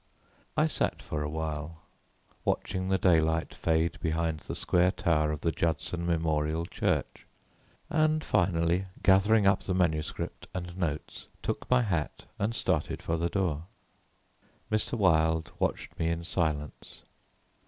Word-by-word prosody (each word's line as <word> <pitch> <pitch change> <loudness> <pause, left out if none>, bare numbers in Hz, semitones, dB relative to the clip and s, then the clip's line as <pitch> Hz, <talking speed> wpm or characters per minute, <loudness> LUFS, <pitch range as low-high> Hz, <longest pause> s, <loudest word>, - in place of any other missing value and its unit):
I - - +5
sat - - 0
for 75 - -4
a 75 - -2
while 80 0 -4 0.6
watching 95 -1 -1
the 95 - +3
daylight 80 -3 +2
fade 80 0 0
behind 80 -1 -1
the - - -6
square 90 +1 +3
tower 75 -5 +1
of 75 - -4
the 85 - +1
Judson 85 +2 -1
Memorial 80 -1 0
Church, - - -2 0.6
and 155 0 +2
finally, 85 +1 +2 0.2
gathering 100 +2 +5
up 95 - +4
the 95 - -2
manuscript 80 -4 -1
and 90 -1 -5
notes, 80 -5 -4 0.2
took - - -3
my 125 -1 +4
hat 85 -8 -2
and 110 +3 0
started 85 -9 -1
for 80 - 0
the 85 +1 0
door. 85 -5 -1 1.1
Mr. 110 +2 0
Wilde 80 -4 +3
watched - - -2
me 80 - +1
in 85 0 -1
silence. 75 -4 -2
85 Hz, 135 wpm, -29 LUFS, 80-95 Hz, 1.1 s, I